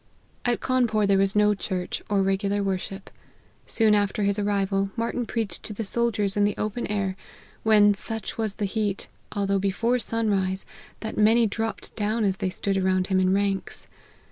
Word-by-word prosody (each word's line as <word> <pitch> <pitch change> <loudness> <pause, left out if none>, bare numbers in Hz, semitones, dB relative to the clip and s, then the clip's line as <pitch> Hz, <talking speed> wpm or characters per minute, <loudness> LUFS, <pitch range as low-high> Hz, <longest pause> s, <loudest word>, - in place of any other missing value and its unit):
At 245 -1 +1
Cawnpore 240 -5 +2
there 200 -1 +3
was 195 +1 +2
no 210 0 +5
church, 185 -2 -3
or 200 -1 +2
regular 200 +1 0
worship. 195 0 -4 0.6
Soon 220 -2 +3
after 205 0 +1
his 200 +1 +1
arrival, 195 -1 0
Marty 230 +1 -2
n 245 - -1
preached 220 -7 -3
to 215 - -6
the 220 +1 -4
soldiers 210 -3 0
in 205 - +3
the 205 0 +1
open 215 +3 -2
air, 200 -2 -1 0.5
when, 210 -2 +5
such 225 +2 -5
was 220 -3 -2
the 210 - -1
heat, 205 -1 -2 0.2
although 200 -1 +1
before 225 +6 +1
sunrise, 200 -5 0 0.4
that 220 -1 -4
many 225 +2 +5
dropped 225 +1 -3
down 215 +1 0
as 195 -2 +1
they 195 -4 -1
stood 195 +2 -1
around 185 -1 +2
him 185 - +4
in 185 0 +3
ranks. 195 0 0
205 Hz, 175 wpm, -25 LUFS, 195-220 Hz, 0.6 s, no